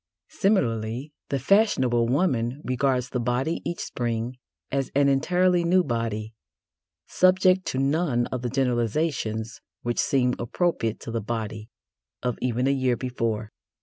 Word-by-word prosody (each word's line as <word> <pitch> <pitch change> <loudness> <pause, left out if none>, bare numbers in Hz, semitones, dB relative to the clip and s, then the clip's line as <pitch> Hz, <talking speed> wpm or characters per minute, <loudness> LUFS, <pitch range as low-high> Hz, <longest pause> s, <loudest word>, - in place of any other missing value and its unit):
Similarly, 135 - 0 0.2
the 140 - 0
fashionable 130 - +3
woman 130 -3 +1
regards 125 0 0
the 125 - -1
body 125 +7 -1
each 170 - -3
Spring 120 +1 -3 0.3
as 135 -2 -1
an 140 0 +4
entirely 180 +6 +2
new 180 +2 +4
body, 115 -4 -3 0.7
subject 185 0 +3
to - - -2
none 135 -2 +1
of 130 - -2
the 125 - -2
generalisations 120 -3 -1 0.2
which 120 0 -1
seemed 125 -2 +2
appropriate 120 - -1
to - - -6
the 115 -1 -2
body 110 0 -4 0.5
of 125 -2 -1
even 125 0 0
a 135 - +3
year 130 -3 +1
before. 115 -4 -2
125 Hz, 135 wpm, -25 LUFS, 115-150 Hz, 0.7 s, an